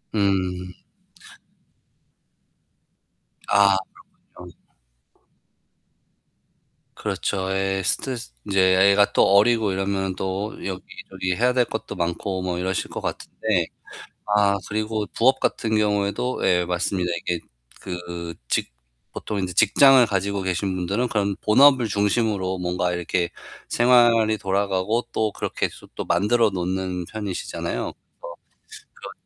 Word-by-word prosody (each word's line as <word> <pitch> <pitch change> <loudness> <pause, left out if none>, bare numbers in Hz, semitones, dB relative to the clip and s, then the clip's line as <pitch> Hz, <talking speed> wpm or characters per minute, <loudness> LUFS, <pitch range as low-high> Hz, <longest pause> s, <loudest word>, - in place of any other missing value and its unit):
음. 90 -3 0 2.7
아 100 -1 +5 0.6
그렇군요. 90 -1 -12 2.4
그렇죠. 95 -1 -2
예, 95 0 0
스트레스 120 - -2
인제 95 -1 0
애 95 +1 +5
애가 100 0 +3
또 - - +5
어리고 105 +1 +4
이러면 95 0 -2
또 95 +3 -3
여기저기 95 -1 -5
해야 125 +4 +2
될 125 -1 +3
것도 - - -6
많고 90 +2 -2
뭐 90 -1 -2
이러실 95 +1 -2
것 - - -6
같은데. - - -6 1.0
아 100 -1 +4
그리고 110 0 -2
부업 130 - +3
같은 110 -1 0
경우에도 105 +4 0
예 90 -2 +3
맞습니다. 90 0 -1
이게 90 -2 -2 0.4
그 85 -2 -6
직 - - -1 0.4
보통 105 - -5
인제 95 -2 -3
직장을 130 - +6
가지고 100 0 -1
계신 95 +1 -1
분들은 100 +7 -1
그런 100 -3 -1
본업을 130 +2 +5
중심으로 100 -2 0
뭔가 90 0 -1
이렇게 90 0 -1 0.4
생활이 120 -3 +4
돌아가고 100 +3 0
또 110 -2 0
그렇게 - - -2
해서 - - -15
또 - - -3
만들어 105 +6 +2
놓는 90 -1 -3
편이시잖아요. 105 -2 -4 0.4
뭐 85 - -8 0.6
그런 - - -10
95 Hz, 255 characters per minute, -23 LUFS, 90-110 Hz, 2.7 s, 직장을